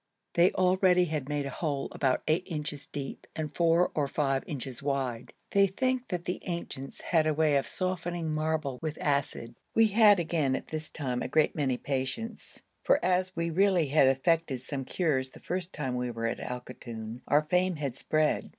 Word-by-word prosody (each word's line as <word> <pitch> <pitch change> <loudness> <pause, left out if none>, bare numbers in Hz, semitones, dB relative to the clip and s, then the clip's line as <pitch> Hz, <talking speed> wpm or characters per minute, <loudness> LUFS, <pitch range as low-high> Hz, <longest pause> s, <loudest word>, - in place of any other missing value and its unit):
They 175 +2 +5
already 185 -1 +4
had 150 -4 -3
made 145 -1 -1
a 140 - -4
hole 145 -1 -2
about 130 -2 0
8 155 +3 +3
inches 150 -3 -4
deep 140 -2 -6
and 155 -2 -4
4 170 +2 +3
or 145 -2 0
5 135 -1 0
inches 130 -4 -5
wide. 135 -4 -2 0.2
They 200 0 +5
think 255 +6 -1
that 180 -3 -3
the 180 - -3
ancients 170 -6 -5
had 160 -3 +2
a 155 - +1
way 155 -1 +3
of 140 - +1
softening 175 -3 -2
marble 155 -4 -1
with 155 -1 -3
acid. 140 -5 -1 0.2
We 225 -1 +5
had 210 -2 +6
again 155 -5 +1
at - - -6
this 155 0 -4
time 125 -5 -3
a - - -2
great 155 +3 +2
many 135 -4 0
patients; 140 - -4 0.2
for, - - +4
as 185 0 +1
we 170 0 -1
really 180 -3 +3
had 140 -1 +5
effected 135 0 +1
some 135 0 -3
cures 135 -7 0
the - - -15
first 180 0 -3
time 130 -4 -3
we 125 0 -1
were 115 -1 -4
at 115 - -1
Al 125 0 -4
Koton, 120 -2 -8
our 150 +1 +4
fame 180 +3 +1
had 140 -5 -3
spread. 155 -1 0
155 Hz, 190 wpm, -29 LUFS, 135-175 Hz, 0.2 s, had